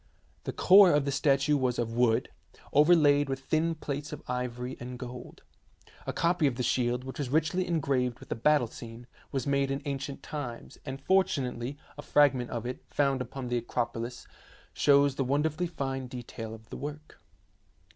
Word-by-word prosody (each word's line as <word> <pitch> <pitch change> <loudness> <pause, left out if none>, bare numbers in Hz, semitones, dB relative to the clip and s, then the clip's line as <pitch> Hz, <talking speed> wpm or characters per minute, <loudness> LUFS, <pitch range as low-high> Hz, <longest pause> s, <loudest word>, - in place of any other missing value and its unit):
The - - -2
core 190 -1 +7
of 145 -1 +2
the 140 - 0
statue 140 +1 +2
was 130 -3 0
of 115 -1 -2
wood, 120 0 +2 0.4
over 150 +5 +6
laid 145 -3 +4
with 135 0 -3
thin 160 +4 0
plates 145 -1 -5
of 150 - -7
ivory 125 0 -3
and 125 +1 -7
of - - -7
gold. 125 0 -9 0.6
A - - 0
copy 170 -2 +2
of 130 - -1
the 125 - -2
shield, 125 +1 +1
which 130 +2 -8
was 140 -4 -2
richly 160 +6 +1
engraved 135 -7 0
with - - -14
a - - +1
battle 145 +3 +3
scene, 115 +1 -10 0.3
was 135 - -2
made 140 -1 +1
in 135 +1 -3
ancient 140 0 -4
times, 130 -6 -6
and 135 0 -5
fortunately 140 -7 0 0.2
a - - -3
fragment 135 -5 +3
of 120 -1 -4
it, 125 +1 -5
found 140 -2 +1
upon 125 +1 -5
the 120 - +1
Acropolis, 120 0 -3 0.5
shows 140 -1 +4
the 135 - +1
wonderfully 150 +6 0
fine 135 -5 -4
detail 120 -3 -7
of 110 0 -17
the - - -5
work. 150 +2 -8
135 Hz, 180 wpm, -29 LUFS, 125-145 Hz, 0.6 s, core